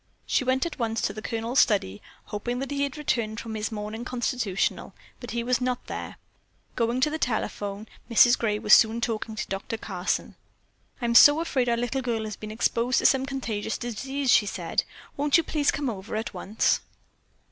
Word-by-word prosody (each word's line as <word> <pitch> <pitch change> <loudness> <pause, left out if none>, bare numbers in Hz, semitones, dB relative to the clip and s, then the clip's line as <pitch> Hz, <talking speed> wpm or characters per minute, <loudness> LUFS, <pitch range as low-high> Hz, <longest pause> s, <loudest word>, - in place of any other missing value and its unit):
She - - +1
went 260 +2 +1
at 335 - -6
once 225 -1 -1
to 200 - -1
the 215 - -7
Colonel's 230 +4 -1
study, 105 - +2 0.2
hoping 240 +4 -4
that 270 +2 -4
he 280 0 -1
had 280 +1 -2
returned 230 -7 -1
from 225 - -6
his 215 +1 -3
morning 215 +2 -5
constitutional, 240 -5 -2 0.2
but 245 - -8
he 235 0 -2
was 250 +1 +1
not 250 0 -1
there. - - -6 0.6
Going 235 +2 0
to 300 - +3
the 315 - -3
telephone, 210 -4 -2 0.2
Mrs. 240 +1 +6
Gray 210 -2 0
was 210 0 +3
soon 225 +1 +6
talking 225 -1 -3
to - - -4
Doctor 195 +3 -4
Carson. 190 -4 -3 0.7
"I'm 235 0 +1
so 290 +6 +8
afraid 265 -7 0
our 235 - +2
little 245 +3 -1
girl 235 -3 -2
has 215 -1 -5
been 215 - -8
exposed 235 +3 +1
to - - +1
some 265 -1 +4
contagious 225 -6 -3
disease," 265 +3 -2
she 210 - +5
said. - - -2 0.3
"Won't 290 +2 +4
you 335 - +2
please 295 -3 0
come 290 -2 -1
over 210 -3 -5
at 220 +1 -3
once?" 215 +3 +1
235 Hz, 190 wpm, -26 LUFS, 215-260 Hz, 0.7 s, so